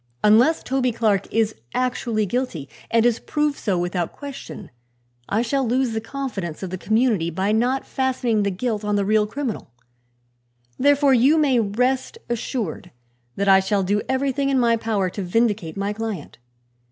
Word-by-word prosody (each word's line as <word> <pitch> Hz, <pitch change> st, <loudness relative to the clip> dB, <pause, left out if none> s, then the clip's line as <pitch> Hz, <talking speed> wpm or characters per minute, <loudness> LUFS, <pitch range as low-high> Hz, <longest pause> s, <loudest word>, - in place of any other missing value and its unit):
Unless 235 Hz, +10 st, +5 dB
Toby 255 Hz, -1 st, 0 dB
Clark 215 Hz, -4 st, 0 dB
is 225 Hz, -1 st, +1 dB, 0.2 s
actually 245 Hz, -4 st, 0 dB
guilty, 200 Hz, -, -3 dB, 0.2 s
and 230 Hz, 0 st, +3 dB
is 240 Hz, -2 st, +2 dB
proved 295 Hz, -1 st, -1 dB
so 195 Hz, -4 st, 0 dB
without 175 Hz, -1 st, -2 dB
question, 280 Hz, -1 st, -9 dB, 0.6 s
I 220 Hz, +3 st, +1 dB
shall 270 Hz, +3 st, 0 dB
lose 250 Hz, +1 st, +1 dB
the 220 Hz, 0 st, -2 dB
confidence 220 Hz, -, -5 dB
of 185 Hz, -, -5 dB
the 185 Hz, -, -3 dB
community 220 Hz, -6 st, +1 dB
by 190 Hz, +5 st, -1 dB
not 245 Hz, +5 st, +1 dB
fastening 250 Hz, -5 st, 0 dB
the 200 Hz, -, +1 dB
guilt 215 Hz, +2 st, -2 dB
on 210 Hz, 0 st, 0 dB
the 200 Hz, -1 st, +1 dB
real 210 Hz, +1 st, +2 dB
criminal. 250 Hz, -, -4 dB, 1.1 s
Therefore 285 Hz, 0 st, +4 dB
you 265 Hz, +6 st, +5 dB
may 275 Hz, -5 st, +3 dB
rest 250 Hz, -, 0 dB
assured 230 Hz, -, -3 dB, 0.5 s
that 200 Hz, -, -1 dB
I 190 Hz, -1 st, +7 dB
shall 195 Hz, +1 st, 0 dB
do 205 Hz, +3 st, +1 dB
everything 275 Hz, +1 st, 0 dB
in 270 Hz, -, +2 dB
my 235 Hz, -1 st, +3 dB
power 220 Hz, -4 st, -1 dB
to 200 Hz, -, -5 dB
vindicate 200 Hz, -3 st, 0 dB
my 200 Hz, +1 st, -1 dB
client. 210 Hz, -, -6 dB
225 Hz, 165 wpm, -22 LUFS, 200-260 Hz, 1.1 s, I